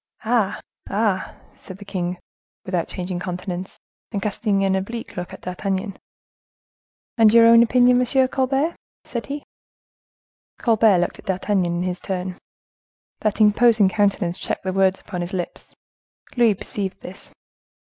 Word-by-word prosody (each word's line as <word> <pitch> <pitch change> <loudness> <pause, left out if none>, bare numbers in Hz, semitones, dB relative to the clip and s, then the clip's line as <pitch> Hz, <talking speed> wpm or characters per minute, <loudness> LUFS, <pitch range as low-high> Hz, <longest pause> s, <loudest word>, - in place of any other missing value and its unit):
"Ah! 220 -4 +1 0.3
ah!" 200 -2 0 0.2
said 185 - -10
the 205 - -12
king, 180 -2 -3 0.5
without 180 -3 -1
changing 180 -1 -4
countenance, 180 0 -5 0.3
and 205 - -2
casting 200 0 0
an 190 0 +2
oblique 225 +5 -5
look 180 -1 -5
at - - -10
D'Artagnan. 190 +2 -3 1.2
"And 220 -2 +7
your 230 0 +7
own 230 0 +8
opinion, 245 +1 +4
M. 260 +1 +3
Colbert?" 270 +6 0 0.3
said 235 -1 -5
he. 285 +1 -5 1.1
Colbert 220 -4 +4
looked 175 - -1
at - - -14
D'Artagnan 185 -2 0
is - - -1
his 180 0 -3
turn. 185 -1 -4 0.8
That 215 0 -1
imposing 215 -1 +5
countenance 195 -4 0
checked - - -3
the 185 0 -2
words 190 0 +2
upon 180 -3 -6
his 175 +3 -5
lips. 180 -2 -5 0.6
Louis 235 -4 +4
perceived 195 0 -5
this. 185 - -11
195 Hz, 140 wpm, -22 LUFS, 185-230 Hz, 1.2 s, own